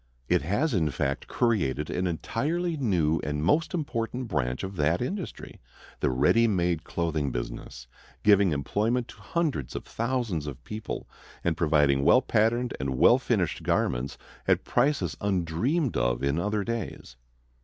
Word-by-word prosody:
It - - +3
has 105 - 0
in 80 -6 +2
fact 70 +1 -2
created 75 - 0
an 90 +1 0
entirely 160 - -1
new 90 - +1
and 75 +1 -2
most 155 - +2
important 125 -6 -3
branch 65 +3 -1
of 95 +1 -5
that 80 +3 +2
industry, 185 +8 -5 0.4
the - - +1
ready 75 - +4
made 90 -5 +1
clothing 80 -5 -1
business, - - -6 0.4
giving 100 -3 +5
employment 110 - 0
to 105 - -13
hundreds 145 - -2
of - - -4
thousands 115 - -2
of 70 -3 -7
people, 105 0 -6 0.4
and 85 -2 +1
providing 75 -4 +3
well 125 - +6
patterned 120 +3 +1
and 65 -1 -2
well - - +6
finished - - 0
garments 65 +2 0 0.3
at - - +3
prices 120 - +1
undreamed 100 - 0
of - - 0
in 70 +3 +1
other 105 +2 0
days. 110 - -5
95 Hz, 145 wpm, -27 LUFS, 75-120 Hz, 0.4 s, well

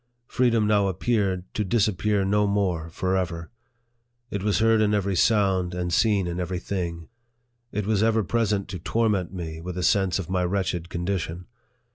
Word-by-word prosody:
Freedom 120 -3 +2
now 105 -2 +3
appeared, 95 -1 0
to 105 - -1
disappear 105 -1 +1
no 105 +1 +2
more 95 -5 0
forever. 90 -1 -2 0.8
It 100 - -2
was 105 0 +1
heard 110 0 +4
in 105 0 +3
every 100 -1 0
sound, 95 -3 +2
and 90 -1 -2
seen 105 -1 +3
in 85 0 -3
every 90 0 -2
thing. 85 -3 -4 0.6
It 105 -1 -2
was 105 -1 +1
ever 110 0 +3
present 105 -1 0
to 90 - -5
torment 100 0 0
me 80 -3 -6
with 90 +1 -6
a 90 - -2
sense 95 -1 +2
of 95 -4 -4
my 90 0 0
wretched 90 -2 -1
condition. 85 -1 -3
95 Hz, 165 wpm, -25 LUFS, 90-105 Hz, 0.8 s, heard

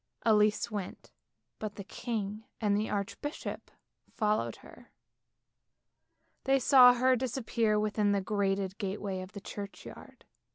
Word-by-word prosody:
Elise 215 0 +3
went, 200 -3 -6 0.5
but 215 -1 -5
the 200 - -7
king 210 0 -4 0.2
and 205 -2 +2
the 210 +1 -1
archbishop 210 +9 -4 0.5
followed 215 -1 0
her, - - -15 1.5
they 270 0 +4
saw 250 -1 +7
her 255 +1 +4
disappear 230 -3 0
within 210 -1 +1
the 200 - +2
grated 195 -1 -1
gateway 195 -1 -3
of 185 +2 -10
the 200 - -8
church 200 0 -8
yard. - - -12
210 Hz, 125 wpm, -31 LUFS, 200-230 Hz, 1.5 s, saw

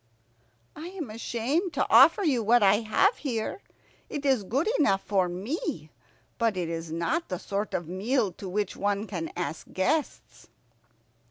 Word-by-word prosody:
"I 315 +3 -7
am 350 - -6
ashamed 255 - -2
to - - +1
offer 410 - +7
you 270 -9 +2
what 225 +1 +4
I 200 +1 +6
have 235 - +2
here. 235 - -3 0.5
It 290 -1 -5
is 265 -5 +3
good 265 - -1
enough 195 -10 +3
for 190 -3 +1
me, 180 - -4 0.5
but 225 -4 +1
it 175 -2 -2
is 165 -1 -5
not 170 - -1
the 180 - -2
sort 200 +3 -3
of 170 - -3
meal 205 +4 0
to 190 +2 -8
which 205 +1 -2
one 205 +1 -1
can 175 -6 -5
ask 175 -2 -4
guests." 290 +11 -2
215 Hz, 160 wpm, -27 LUFS, 185-275 Hz, 0.5 s, offer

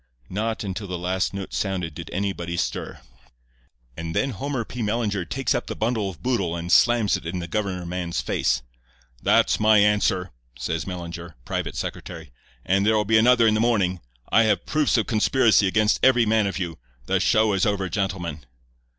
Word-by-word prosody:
Not 110 +4 -2
until 100 +1 -5
the 90 -1 -4
last 90 +2 -1
note 100 -1 -6
sounded 90 -5 -2
did 85 +2 -8
anybody 90 -3 -3
stir. - - -3 0.9
And 85 0 -5
then 135 - +1
Homer 130 +1 -3
P. 125 - -7
Mellinger 105 -4 -1
takes 130 +5 0
up 120 - -2
the - - -4
bundle 110 -3 -1
of 90 - -12
boodle 100 -10 0
and 85 +1 -4
slams 115 -5 +4
it - - -12
in 90 +2 -3
the 85 -1 -4
governor 95 -2 -2
man's 85 -1 -3
face. 65 0 0 0.6
"'That's - - +3
my 110 0 +5
answer,' 100 -3 +2 0.3
says 80 +7 -3
Mellinger, 85 -3 -7
private - - -3
secretary, - - -6 0.3
'and 95 +2 +2
there'll 105 0 +2
be 110 +2 +4
another 120 +1 +5
in 110 - +4
the 110 - +1
morning. 100 -6 +1 0.3
I 115 - +6
have 110 - +1
proofs 155 -4 +1
of 110 - +1
conspiracy 110 -2 +3
against 110 +2 +2
every 125 -3 +5
man 110 -1 +2
of 100 - -3
you. 85 -5 -4 0.3
The - - +1
show 110 -1 +3
is 95 +2 +2
over, 100 -2 0
gentlemen. 90 -6 -3
100 Hz, 180 wpm, -24 LUFS, 90-110 Hz, 0.9 s, I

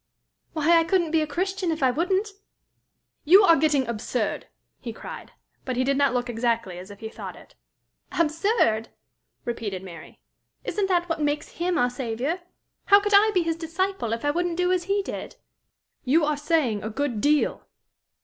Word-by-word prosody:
"Why, 330 +2 +4
I - - +3
couldn't 345 -2 +1
be 320 -1 +3
a 310 - -1
Christian 375 +4 -2
if 315 -3 -1
I 260 - +5
wouldn't!" 380 - 0 0.9
"You 375 +7 +7
are 335 -4 +7
getting 295 -3 +2
absurd!" 230 0 -2 0.3
he 235 - -6
cried. 225 - -9 0.3
But 255 - -3
he 255 - +2
did 275 +1 +1
not 280 -1 +3
look 245 0 0
exactly 230 -6 -1
as 185 +2 -10
if 205 -1 -12
he 220 - -4
thought - - -8
it. - - -16 0.6
"Absurd!" 315 - +1 0.6
repeated 210 -6 -4
Mary. 170 -4 -11 0.4
"Isn't 405 -2 -1
that 350 -2 +1
what 330 -2 -2
makes 295 0 -1
him 350 0 0
our 245 -4 +2
Saviour? 250 +7 -2 0.5
How 400 0 +7
could 415 0 -2
I 420 +2 +6
be 365 -4 +2
his 330 -1 -1
disciple, 335 - -2
if 230 +4 -3
I 290 - +3
wouldn't 345 +1 -1
do 360 0 +2
as 360 -2 0
he 400 +1 0
did?" - - -6 0.7
"You 300 +4 +3
are 300 0 +1
saying 290 -8 0
a 215 - -4
good 240 -2 -2
deal!" 295 +3 +1
300 Hz, 180 wpm, -25 LUFS, 240-350 Hz, 0.9 s, You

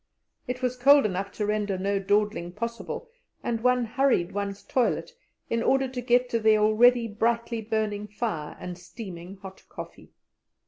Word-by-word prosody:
It 250 +1 -4
was 250 0 0
cold 280 +2 +6
enough 195 0 -2
to 210 - -2
render 210 -2 0
no 200 +1 0
dawdling 205 -3 0
possible, 230 +3 -5 0.4
and 230 -1 -1
one 250 0 +3
hurried 235 -7 +1
one's 200 0 -4
toilet 255 -2 0 0.4
in 230 - 0
order 270 +2 +2
to 250 -1 -5
get 245 +1 +3
to 230 - +1
the 220 -1 +5
already 230 +3 +5
brightly 230 +2 -1
burning 215 -1 -2
fire 205 -8 -4
and 180 0 -7
steaming 180 -1 -9
hot 190 0 -10
coffee. - - -10
215 Hz, 155 wpm, -27 LUFS, 200-245 Hz, 0.4 s, cold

